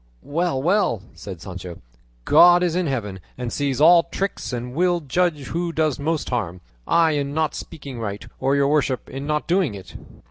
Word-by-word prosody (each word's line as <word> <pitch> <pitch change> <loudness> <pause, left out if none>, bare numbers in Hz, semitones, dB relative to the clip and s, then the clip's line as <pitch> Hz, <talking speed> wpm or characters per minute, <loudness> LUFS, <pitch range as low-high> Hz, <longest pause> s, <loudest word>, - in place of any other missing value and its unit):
"Well, 165 -1 -1
well," 175 - +1
said 95 -5 -9
Sancho, 90 -1 -8 0.5
"God 175 0 +7
is 175 -2 0
in 180 -2 0
heaven, 105 -8 -3 0.2
and 125 -2 -4
sees 140 -3 -1
all 170 +3 +7
tricks, 180 +2 -4
and 125 0 -5
will 175 +3 +2
judge 150 -1 -1
who 170 0 -2
does 155 -3 0
most 155 0 -2
harm, 95 -8 -2 0.3
I 165 -1 +4
in 145 -1 -2
not 160 -1 0
speaking 140 -6 -8
right, 100 -2 -5
or 135 +1 +1
your 140 0 +3
worship 140 -4 0
in 135 +2 -6
not 150 0 -1
doing 175 - +1
it." 95 -2 -11
145 Hz, 180 wpm, -22 LUFS, 125-170 Hz, 0.5 s, God